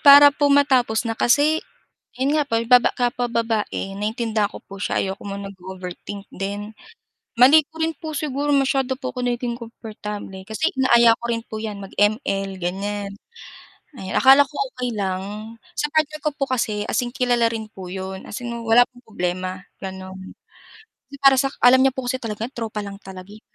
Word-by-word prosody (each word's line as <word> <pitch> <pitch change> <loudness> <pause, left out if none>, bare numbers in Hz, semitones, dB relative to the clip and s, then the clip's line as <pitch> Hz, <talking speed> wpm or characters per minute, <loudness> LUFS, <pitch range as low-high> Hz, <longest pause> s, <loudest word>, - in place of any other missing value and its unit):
Para 285 0 +9
po 290 0 +2
matapos 260 -5 +3
na 225 - -1
kasi, 290 +7 +3 0.6
'yon 270 +3 +1
nga 295 -2 0
po 230 - +1
baba 245 +1 +6
kapwa 245 -1 0
babae 225 -4 -1
naintindihan 215 -1 0
ko - - -11
po 195 0 -11
siya - - -1
ayoko 195 +1 -4
mo 195 - -4
mag-overthink 190 0 -8
din. 205 +3 -5 0.7
Mali 275 +6 +8
ko 320 - -15
rin 325 0 0
po 310 -2 -5
siguro 290 -1 -2
masyado 270 -1 +1
po 255 -2 -5
ko 250 - -4
naging 245 -1 -1
kumportable, 210 -4 -8
kasi 320 - 0
inaaya 235 -3 +5
ko 235 - -5
rin 230 -1 -1
po 215 0 -6
'yan 215 -2 -4
mag 195 - -10
ML 195 -3 +1
ganyan. 200 +3 -3 0.8
Ay 190 -5 -7
akala 270 +2 +7
ko 285 +1 -16 0.2
okay 250 -1 -2
lang 205 +2 -4 0.2
sa 295 - +1
partner 305 -1 +1
ko 295 -1 -2
po 275 -3 -2
kasi 215 -4 0
as 215 - -1
in 245 +1 -3
kilala 245 -2 +2
rin 220 -2 -5
po 190 -3 -9
'yon 190 +1 -6
as 245 +4 -6
in 240 - -4
wala 230 +1 +5
pong 245 0 -19
problema 185 -1 -3 0.2
gano'n 190 0 -8 0.9
para 270 -1 +7
sa 275 - +3 0.2
alam 250 +1 +7
niya 265 0 +3
po 260 -2 -4
kasi 255 +1 -1
talaga 225 0 -5
tropa 220 -4 -4
lang 200 0 -8
talaga 190 -1 -11
eh. 215 +1 -16
230 Hz, 180 wpm, -22 LUFS, 200-260 Hz, 0.9 s, Para